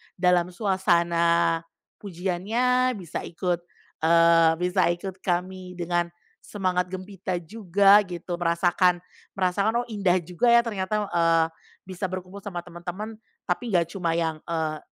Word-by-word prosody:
dalam 180 -1 +3
suasana 170 -3 +2 0.4
pujiannya, 215 +8 0
bisa 180 -5 -6
ikut, 175 0 -2 0.4
eee, 165 0 +5
bisa 180 +1 +2
ikut 190 +1 -8
kami 185 0 -3
dengan 175 0 -1 0.3
semangat 185 -3 -1
gempita 185 0 -5
juga 200 +1 +4
gitu, 175 0 -5
merasakan 175 +1 +2 0.3
merasakan, 200 +5 +1
oh, - - -15
indah 195 -4 +2
juga 180 +8 -1
ya 235 - +6
ternyata, 210 -2 -2
eee, 165 -1 +3 0.4
bisa 185 +1 -4
berkumpul 185 +1 -7
sama 190 -4 -6
temen-temen. 180 +6 -7 0.2
Tapi 235 -5 -2
nggak 170 -1 +2
cuma 170 -3 -1
yang, 160 -2 -1
eee, 160 -2 -2
180 Hz, 125 wpm, -25 LUFS, 170-195 Hz, 0.4 s, ya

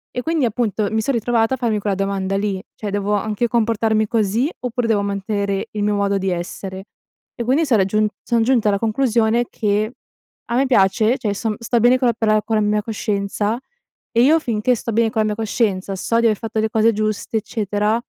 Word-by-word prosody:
e 250 - -1
quindi 320 0 0
appunto 220 -2 -1
mi 220 0 +1
son 275 +5 -1
ritrovata 235 +1 +1
a - - -12
farmi 235 -4 0
quella 200 -1 -1
domanda 195 0 -1
lì: 200 -2 -2
cioè 210 - -5
devo 205 +1 -1
anche 210 +3 0
comportarmi 220 -2 +1
così 225 +5 +1
oppure 245 -1 -2
devo 215 -3 +2
mantenere 200 0 -2
il 210 -1 -3
mio 210 0 +1
modo 200 0 +1
di 195 0 -1
essere? 190 +2 -5 0.5
E 240 - -3
quindi 270 +7 +2
sono 230 -8 +3
giun 215 +2 +1 0.2
son 235 -2 +1
giunta 235 -3 +2
alla 200 -1 +1
conclusione 230 0 +1
che 210 +1 0 0.5
a 235 - -3
me 265 +3 +3
piace 215 +1 +3
cioè 250 -5 -4
io - - 0
son 215 +2 -2
sto 235 +1 0
bene 245 +3 +5
con 255 - +2
la 235 - +3
per 225 -1 -2
la 215 0 +4
con 225 - -1
la 215 - +2
mia 210 0 +1
coscienza, 210 0 -2 0.5
e 235 - +3
io 310 +5 +5
finché 235 -3 0
sto 230 0 -4
bene 225 +1 +3
con 220 -1 0
la 215 - +1
mia 210 - -1
coscienza 205 -3 -1
so 230 +4 0
di 235 - +1
aver 215 -2 +1
fatto 225 -1 -3
le 220 0 +1
cose 225 0 +3
giuste, 215 +1 -2
eccetera, 215 +1 -1
220 Hz, 220 wpm, -20 LUFS, 205-235 Hz, 0.5 s, bene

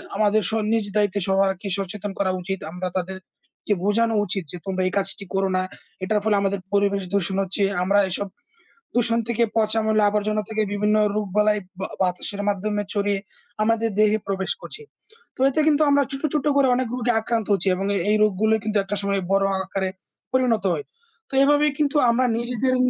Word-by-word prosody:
আমাদের 215 +1 +3
স - - -5 0.2
নিজ 225 -2 +1
দায়িত্বে 205 -1 +2
সবারকে 195 0 +1
সচেতন 200 +1 -4
করা 190 -2 +2
উচিত। 190 +1 -4
আমরা 180 +2 -4
তাদেরকে 190 +3 -5
বোঝানো 225 +3 +2
উচিত 195 0 -2
যে, 180 - -7
তোমরা 190 -1 -2
এই - - -1
কাজটি 195 0 -2
করো 195 0 +1
না, - - +2 0.4
এটার 210 +3 +1
ফলে 215 -1 +2
আমাদের 200 0 0
পরিবেশ 200 -1 +2
দূষণ 195 -1 0
হচ্ছে। 195 +2 -1 0.2
আমরা 200 +2 +3
এসব 200 +3 -2 0.7
দূষণ 235 -1 +3
থেকে 235 0 +1
পচা 220 0 +2
ময়লা 215 -1 +3
আবর্জনা 210 +1 0
থেকে 220 -1 0
বিভিন্ন 210 +1 +1 0.2
রোগ 210 -1 -1
বালাই 210 0 +3 0.4
বাতাসের 190 +2 -2
মাধ্যমে 205 +1 -1
ছড়িয়ে 205 -1 0 0.4
আমাদের 225 +1 +1
দেহে 215 0 +4
প্রবেশ 190 -1 -1
করছে। 450 - -8 0.5
তো - - -12
এতে 275 +3 0
কিন্তু 305 0 +3
আমরা 285 0 +4
ছোট, 275 0 -5
ছোট 300 - 0
করে 275 -2 +4
অনেক 255 -1 -1
রোগে 245 -1 0
আক্রান্ত 225 -1 -1
হচ্ছি। 195 -1 +1
এবং 195 +2 -2
এ - - +2
এই 215 - +4
রোগগুলো 215 +1 +2
কিন্তু 215 -1 0
একটা 200 +1 -3
সময় 200 -1 0
বড় 195 0 +3 0.2
আকারে 190 0 -2 0.4
পরিণত 250 -5 +2
হয়। 150 - -5 0.5
তো - - -7
এভাবে 290 +1 +4
কিন্তু 300 0 +1
আমরা 250 +2 +2
নিজেদের 245 +2 0
210 Hz, 180 wpm, -23 LUFS, 195-225 Hz, 0.7 s, দেহে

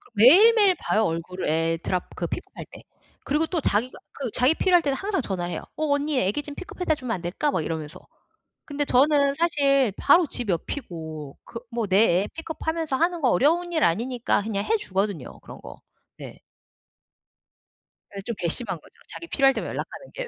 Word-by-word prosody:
매일매일 390 - +7
봐요 220 - +1
얼굴을 170 +3 -3
애 165 +1 +1
drop 180 -1 -1
그 - - -3
pick - - -5
up할 - - -9
때. - - -12 0.4
그리고 300 +3 +1
또 335 0 -2
자기가 240 -1 0 0.2
그 265 -4 -4
자기 255 +5 +4
필요할 355 -2 +4
때는 280 -3 -1
항상 390 -2 -2
전화를 180 -5 -3
해요. - - -4
"어 310 - -1
언니 285 -1 0
아기 250 +9 -1
좀 290 - -9
pick 370 - -8
up - - -18
해다 315 -3 +2
주면 250 -5 -4
안 175 - -7
될까?" 195 - -1
막 175 - -1
이러면서. 155 -2 -5 0.7
근데 290 0 -2
저는 280 +1 +3
사실 280 - +2
바로 330 +4 +4
집 245 -5 -5
옆이고 160 - -5
그 230 - -8
뭐 230 -2 -2
내 190 0 +1 0.3
애 205 - -4
pick 325 - -8
up하면서 320 -4 -2
하는 340 +2 0
거 255 - +3
어려운 345 +5 +2
일 320 - 0
아니니까 235 +5 0
그냥 205 -2 -2
해 450 - +2
주거든요 195 - -3
그런 - - -12
거. 65 - -11 0.4
네. - - -10 1.8
예 195 - -5
좀 230 +2 -5
괘씸한 180 +2 -2
거죠. - - -22
자기 335 - -8
필요할 270 -3 +3
때만 - - -4
연락하는 - - -7
게. - - -5
260 Hz, 400 characters per minute, -24 LUFS, 190-315 Hz, 1.8 s, 매일매일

